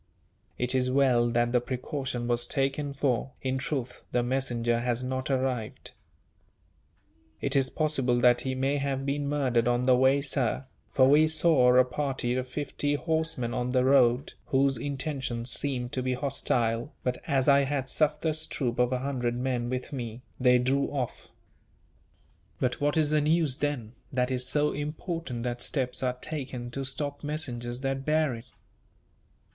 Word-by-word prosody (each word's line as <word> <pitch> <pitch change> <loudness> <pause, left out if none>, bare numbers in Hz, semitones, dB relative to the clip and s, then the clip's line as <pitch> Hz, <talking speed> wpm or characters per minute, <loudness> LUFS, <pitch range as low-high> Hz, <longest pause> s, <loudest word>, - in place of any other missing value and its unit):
"It 125 +1 0
is 130 -1 +1
well 125 -3 +3
that 120 0 +1
the 125 -1 +3
precaution 130 -1 -4
was 120 0 +1
taken 140 +1 -1
for, 135 -2 -1
in 130 0 -1
truth, 130 -2 -4
the 120 - +1
messenger 120 -2 0
has 120 +1 -1
not 130 +1 -3
arrived." 130 -4 -2 1.5
"It 140 0 0
is 135 -2 +3
possible 135 -6 +1
that 120 0 +5
he 130 -1 -2
may 135 +2 0
have 135 -1 -2
been 140 0 -1
murdered 130 -5 +1
on 120 0 +2
the 130 0 +5
way, 130 +2 +4
sir; 135 -2 -1 0.2
for 130 -1 +4
we 150 +3 +6
saw 155 -6 +4
a 130 0 +6
party 130 -1 -2
of 130 0 -2
fifty 145 +1 -1
horsemen 160 -6 -1
on 125 0 -1
the 130 -1 +3
road, 130 -1 +3
whose 135 0 +2
intentions 130 -2 -2
seemed 125 -4 -1
to 130 - -1
be 130 0 -1
hostile, 125 -2 0
but 125 0 -1
as 135 -3 +1
I 140 -1 +5
had 135 -1 -2
Sufder's 155 +2 +1
troop 125 -4 -2
of 125 0 +3
a 130 - +1
hundred 125 -4 -1
men 125 -1 -1
with 130 +3 -4
me, 120 -2 -5 0.2
they 125 -1 +5
drew 135 +3 +1
off." 135 -4 -4 1.3
"But 125 +1 -1
what 145 +2 +1
is 155 -2 +2
the 155 -1 +3
news, 155 -3 +2
then, 135 -7 -2 0.2
that 125 0 0
is 125 0 0
so 150 +2 +2
important 150 -3 -4
that 120 0 -3
steps 125 -3 -1
are 125 -1 0
taken 125 -3 -5
to 135 +2 -3
stop 145 +2 -3
messengers 125 -5 -3
that 135 0 -2
bear 155 -2 +2
it?" 115 +1 -8
130 Hz, 165 wpm, -28 LUFS, 125-140 Hz, 1.5 s, we